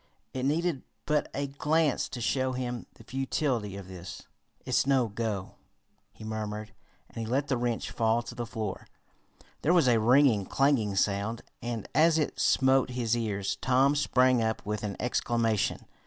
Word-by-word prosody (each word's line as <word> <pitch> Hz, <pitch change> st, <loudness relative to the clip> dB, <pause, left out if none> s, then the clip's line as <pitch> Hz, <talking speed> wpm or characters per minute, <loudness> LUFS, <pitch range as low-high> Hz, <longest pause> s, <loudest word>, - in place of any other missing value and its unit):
It 130 Hz, 0 st, -2 dB
needed 155 Hz, 0 st, 0 dB, 0.2 s
but 150 Hz, -1 st, +1 dB
a 140 Hz, +1 st, -2 dB
glance 150 Hz, +2 st, +1 dB
to 120 Hz, -, -6 dB
show 130 Hz, +2 st, 0 dB
him 125 Hz, -2 st, -4 dB
the -, -, -15 dB
futility 130 Hz, -6 st, -1 dB
of 100 Hz, -2 st, -9 dB
this. 90 Hz, -1 st, -9 dB, 0.4 s
"It's -, -, +1 dB
no 135 Hz, -4 st, +3 dB
go," 105 Hz, -3 st, -4 dB, 0.5 s
he -, -, -13 dB
murmured, 110 Hz, 0 st, -5 dB, 0.3 s
and -, -, -10 dB
he 115 Hz, -, -2 dB
let 135 Hz, +5 st, 0 dB
the 130 Hz, -, +2 dB
wrench 120 Hz, -1 st, -2 dB
fall 115 Hz, 0 st, +1 dB
to 120 Hz, -, -8 dB
the 120 Hz, -1 st, -5 dB
floor. 110 Hz, -4 st, -5 dB, 0.7 s
There 165 Hz, -, +3 dB
was 165 Hz, -7 st, +4 dB
a 120 Hz, -2 st, +4 dB
ringing, 120 Hz, -3 st, +4 dB
clanging 135 Hz, -8 st, +2 dB
sound, 100 Hz, +4 st, 0 dB, 0.2 s
and 120 Hz, -3 st, -4 dB
as 160 Hz, +2 st, +5 dB
it 155 Hz, -, -1 dB
smote 130 Hz, -1 st, +3 dB
his 120 Hz, -2 st, 0 dB
ears 105 Hz, -4 st, -2 dB
Tom 135 Hz, +2 st, +3 dB
sprang 130 Hz, -3 st, +3 dB
up 110 Hz, 0 st, -1 dB
with 105 Hz, 0 st, -3 dB
an 100 Hz, -2 st, -3 dB
exclamation. 115 Hz, -3 st, 0 dB
120 Hz, 165 wpm, -29 LUFS, 110-135 Hz, 0.7 s, as